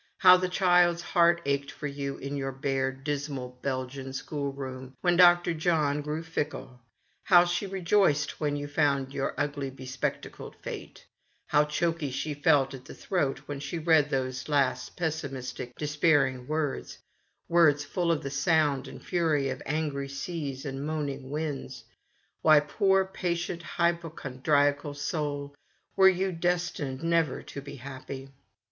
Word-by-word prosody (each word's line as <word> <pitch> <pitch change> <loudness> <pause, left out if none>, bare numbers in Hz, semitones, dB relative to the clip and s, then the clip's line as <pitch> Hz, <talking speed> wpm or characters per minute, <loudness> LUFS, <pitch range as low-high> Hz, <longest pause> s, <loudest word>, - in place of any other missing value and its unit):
How 185 -1 +8
the 185 0 0
child's 175 -2 +3
heart 170 -1 +3
ached 140 0 0
for - - -8
you 140 -1 -4
in 140 +1 -5
your 135 -1 -2
bare, 135 0 -1
dismal, 135 -2 -5
Bel 130 -2 -1
gian 135 +1 -8
schoolroom, 135 -2 -5
when 175 -1 +3
Dr. 175 -1 +6
John 155 -3 +1
grew 150 +2 -3
fickle; 150 -6 -4 0.4
how 175 -2 +7
she 175 +3 -1
rejoiced 190 -4 +1
when 145 -1 0
you 145 0 -4
found 140 -2 +1
your 135 - -2
ugly, 145 -1 -2
be 130 0 -11
spectacled 130 +1 -4
Fate; - - -8 0.4
how 150 +1 +3
choky 160 0 -1
she 135 +4 -3
felt 140 -1 +3
at 130 -1 -9
the - - -10
throat 145 -7 -1
when 145 -1 -5
she 140 +4 -4
read 160 -2 +3
those 130 -1 -2
last 135 -3 0
pessimis 140 -6 -3
tic, 120 - -7
despairing 145 -4 +2
words 155 -2 -2 0.3
— - - -45
words 155 -4 +4
full 170 +2 0
of 165 - 0
the 140 - -4
sound 145 -1 +2
and - - -10
fury 155 -6 +1
of 130 0 -4
angry 145 -2 -2
seas 140 -1 -5
and 135 0 -4
moaning 145 -3 -3
winds. 150 -1 -4 0.6
Why, 155 -1 +7
poor 190 +6 +2
patient 175 -2 -3
hypochondriacal 145 -4 0
soul, 145 -1 -3 0.4
were 190 0 +7
you 190 +1 0
destined 165 -5 -2
never 165 -4 +1
to 140 - -8
be 140 - -9
happy 135 0 -8
145 Hz, 150 wpm, -28 LUFS, 135-165 Hz, 0.6 s, How